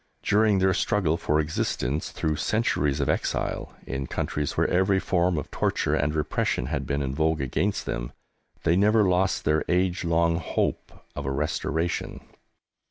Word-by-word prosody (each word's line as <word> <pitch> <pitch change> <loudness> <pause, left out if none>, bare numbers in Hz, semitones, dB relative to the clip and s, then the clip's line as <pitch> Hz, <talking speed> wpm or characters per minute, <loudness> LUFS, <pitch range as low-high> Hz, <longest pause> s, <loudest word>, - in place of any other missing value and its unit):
During 105 -1 +3
their 95 0 +3
struggle 90 -3 +1
for 75 -2 0
existence 75 -2 -1
through 75 -1 -2
centuries 75 -7 0
of 70 - 0
exile, - - -2
in 65 -1 -4
countries 75 -1 -2
where - - +3
every 95 +2 +2
form 90 -2 +1
of 75 - -5
torture - - 0
and 75 +1 +1
repression 75 -4 0
had 70 -1 -3
been 70 0 -1
in 65 -1 -2
vogue 80 +2 +1
against 95 +10 -1
them, - - -3 0.5
they 85 - +3
never 105 +3 +4
lost 90 +1 +1
their 75 +1 +2
age 90 +1 +1
long 85 0 +2
Hope 80 - -2 0.2
of 70 - -4
a - - 0
Restoration. 80 +4 -2
80 Hz, 160 wpm, -26 LUFS, 75-95 Hz, 0.5 s, never